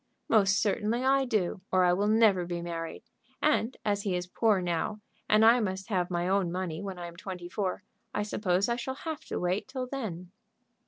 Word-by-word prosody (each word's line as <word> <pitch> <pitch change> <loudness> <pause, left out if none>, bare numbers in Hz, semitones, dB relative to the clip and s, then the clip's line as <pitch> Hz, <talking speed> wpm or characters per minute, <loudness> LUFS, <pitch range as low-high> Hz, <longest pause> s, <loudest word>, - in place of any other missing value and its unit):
"Most 205 -2 +4
certainly 220 +3 0
I 270 0 +4
do, 200 -6 0
or 185 -1 +4
I 175 0 +4
will 200 +3 +1
never 215 -4 +4
be 175 -1 -3
married; 170 +1 -5 0.4
and 265 -5 +1
as 205 -1 +1
he 195 -3 -1
is 180 0 -2
poor 210 +2 +2
now, 175 +4 -2 0.3
and 215 +1 +6
I 235 +2 +7
must 190 -1 -3
have 180 -4 0
my 175 0 -1
own 190 -2 +1
money 180 -2 -3
when 195 -2 -5
I 175 - -6
am 170 0 -9
twenty 180 -1 -7
four, 185 +1 -2 0.3
I 210 - -1
suppose 200 -2 0
I 235 0 0
shall 260 +2 -4
have 315 +1 -5
to - - -3
wait 180 +3 -1
till 260 -1 -4
then." 200 -10 -5
195 Hz, 205 wpm, -29 LUFS, 180-220 Hz, 0.4 s, I